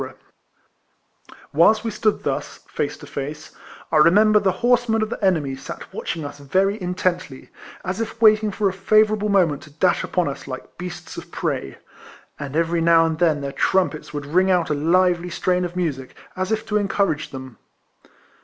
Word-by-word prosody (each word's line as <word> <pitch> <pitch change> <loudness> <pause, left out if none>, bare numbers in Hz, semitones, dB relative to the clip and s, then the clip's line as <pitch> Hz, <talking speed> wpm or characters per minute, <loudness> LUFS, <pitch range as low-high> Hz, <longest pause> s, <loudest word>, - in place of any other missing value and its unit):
Whilst 210 +9 +4
we 225 - -2
stood 215 0 0
thus, - - -3
face - - -3
to - - -12
face, 150 +2 -6 0.4
I - - +3
re 155 +2 +7
member 210 +3 +5
the 195 -2 +2
horsemen 240 -3 +3
of 215 - -4
the - - -5
enemy 155 -8 +1
sat 135 - -9
watching 160 -3 -4
us 145 0 -8
very 190 +8 0
intently, 180 -5 -2 0.4
as 185 +4 -2
if 225 0 -5
waiting 215 -1 +5
for 205 0 0
a 190 - -1
favourable 215 +2 +2
moment 175 -8 +2
to 155 - -14
dash 170 +5 +1
upon 180 -3 0
us 140 0 -6
like 130 -1 -8
beasts 180 -1 -7
of - - -9
prey; 65 - -3 0.6
and 140 +1 -6
every 165 +1 +1
now 165 0 +5
and 160 -1 -2
then 160 -4 +2
their 140 0 -4
trumpets 180 0 0
would 145 -1 -5
ring 185 +6 +2
out 175 -4 +2
a - - +3
lively 175 +3 +2
strain 180 +1 0
of 175 0 -4
music, 145 -8 -3 0.2
as 185 +2 -2
if 220 0 -1
to 210 - 0
encourage 195 -6 0
them. 130 -2 -9
180 Hz, 180 wpm, -22 LUFS, 150-205 Hz, 0.6 s, re